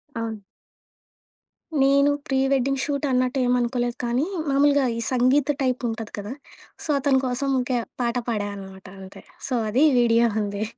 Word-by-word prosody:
ఆ! 225 -2 -4 1.4
నేను 280 +1 +4 0.2
pre 265 - 0
wedding 275 0 +1
shoot 285 -1 -2
అన్నట్టేం 255 0 +1
అనుకోలేదు 240 0 -1
కానీ, 245 +5 0 0.2
మామూలుగా 280 0 +3
ఈ - - -3
సంగీత్ 260 +3 +3
టైపుంటది 235 -4 -2
కదా! 205 +5 -5 0.5
సో, - - -7
అతని 270 -1 +2
కోసం 260 +2 -1
ఇంక 250 +1 -3 0.3
పాట 235 0 0
పాడా 205 -3 -1
అనమాట 190 -1 -11 0.2
అంతే. 190 0 -12 0.2
సో, 260 - -3 0.2
అది 260 +8 +2 0.2
వీడియో 235 0 +4 0.2
ఉంది. 205 +1 -3
250 Hz, 140 wpm, -23 LUFS, 230-275 Hz, 1.4 s, నేను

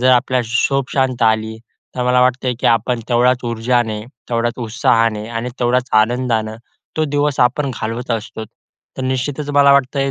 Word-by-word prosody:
जर 130 +1 +4
आपल्या 125 0 +2 0.3
झोप 135 -1 -1
शांत 130 -3 0
आली, 110 0 +1 0.4
तर 125 - -1
मला 125 0 +3
वाटतं 130 +1 +1
आहे, 125 - 0
की - - +1
आपण 115 +1 +1
तेवढ्याच 125 +1 +3
ऊर्जाने, 115 -1 0 0.3
तेवढ्याच 120 0 -1
उत्साहाने 115 -2 +1
आणि 115 +1 -4
तेवढ्याच 125 +1 +1
आनंदानं 115 -2 -1 0.4
तो 155 - +1
दिवस 145 -1 -1
आपण 130 +3 +2
घालवत 115 +3 -4
असतो. 110 0 -4 0.5
तर 130 - -4
निश्चितच 130 +3 -2
मला 140 -1 +5
वाटतं 140 0 +2
आहे 135 0 +1
125 Hz, 165 wpm, -18 LUFS, 115-130 Hz, 0.5 s, मला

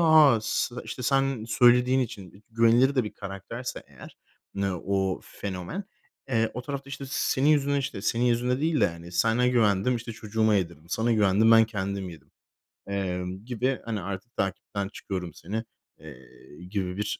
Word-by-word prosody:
ha, 155 -7 +7
s 115 +2 -1
işte 125 - -6
sen 135 -2 +1
söylediğin 125 +3 +5
için 105 -5 -6
güvenilir 115 +4 +4
de 130 -4 +2
bir 105 - -6
karakterse 100 +5 -6
eğer - - -14 0.4
ne 100 -1 0
o 95 +1 -1
fenomen, 100 - -6 0.4
eee, 115 -3 +1
o 125 - -4
tarafta 140 0 -5
işte 140 0 -6
"senin 135 +1 +1
yüzünden" 140 -2 +3
işte 130 -7 -4
"senin 120 +3 +1
yüzünden" 125 +2 +1
değil 160 -1 +1
de - - +5
hani, 85 +1 -8
"Sana 115 +7 +3
güvendim 115 0 +3
işte 115 0 -6
çocuğuma 110 0 +1
yedirdim. 85 -4 -2
Sana 115 +6 +1
güvendim 105 +1 +4
ben 115 0 +8
kendim 100 -3 -3
yedim." 80 -4 -14 0.6
emm, 95 0 -3
gibi 125 +2 -1
hani 110 -4 -3
artık 95 +5 -7
"takipten 95 +1 -2
çıkıyorum 90 -5 -5
seni" 110 +9 -4 0.4
eee, 70 -5 -12 0.4
gibi 95 -2 -3
bir, 105 0 -2
110 Hz, 160 wpm, -27 LUFS, 95-125 Hz, 0.6 s, ben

